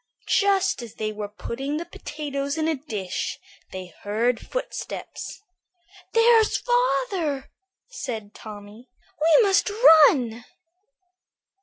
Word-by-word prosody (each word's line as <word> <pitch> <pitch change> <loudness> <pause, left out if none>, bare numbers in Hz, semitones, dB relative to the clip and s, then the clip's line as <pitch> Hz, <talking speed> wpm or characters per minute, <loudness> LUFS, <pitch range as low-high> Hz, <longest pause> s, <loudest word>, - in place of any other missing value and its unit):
Just 390 -7 +2
as 235 -3 -10
they 215 -1 -3
were 210 -1 -5
putting 270 +7 -5
the 335 - -4
potatoes 285 -2 -5
in 315 0 0
a 325 - +2
dish 220 - -4 0.3
they 185 -2 -8
heard 225 +3 0
footsteps. - - -6 0.7
"There's 455 -1 +5
father," 410 - 0 0.4
said 225 - -6
Tommy; 210 +3 -11 0.3
"we 330 +10 +6
must 395 +1 +3
run." 295 - +5
280 Hz, 105 wpm, -24 LUFS, -, 0.7 s, we